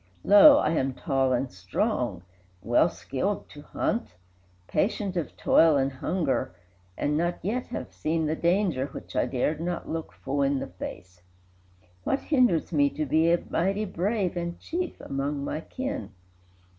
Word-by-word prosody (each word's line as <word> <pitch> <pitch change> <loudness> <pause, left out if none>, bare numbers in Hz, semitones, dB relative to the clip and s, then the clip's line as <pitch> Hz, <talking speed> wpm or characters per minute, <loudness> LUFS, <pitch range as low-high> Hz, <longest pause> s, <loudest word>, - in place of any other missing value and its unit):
Lo, 280 +9 +9
I - - +2
am 135 -5 0
tall 135 -4 0
and 130 +1 0
strong, 95 - -2 0.4
well - - +4
skilled - - -3
to - - -11
hunt, 90 - -2 0.5
Patient 195 +2 0
of 170 -3 -3
toil 160 -3 +5
and 135 0 +1
hunger, 140 - -1 0.4
and 150 - 0
not 175 +2 0
yet 245 +5 -1
Have 240 - -6
seen 160 +1 -1
the 155 +1 0
danger 170 -6 +1
which - - -10
I - - +2
dared 150 +5 -1
not 175 0 -3
look 160 0 -4
Full 140 +1 -3
in 140 0 +2
the - - -3
face; 90 0 -9 0.8
what 270 - 0
hinders 250 - +2
me 145 -2 +4
to 155 - -3
be 160 +4 +3
A 170 - +2
mighty 195 +5 +1
Brave 190 0 -1
and 170 0 -4
Chief 350 +1 -4
among 140 +1 -3
my 155 - -3
kin?" 260 - -5
160 Hz, 155 wpm, -27 LUFS, 135-190 Hz, 0.8 s, Lo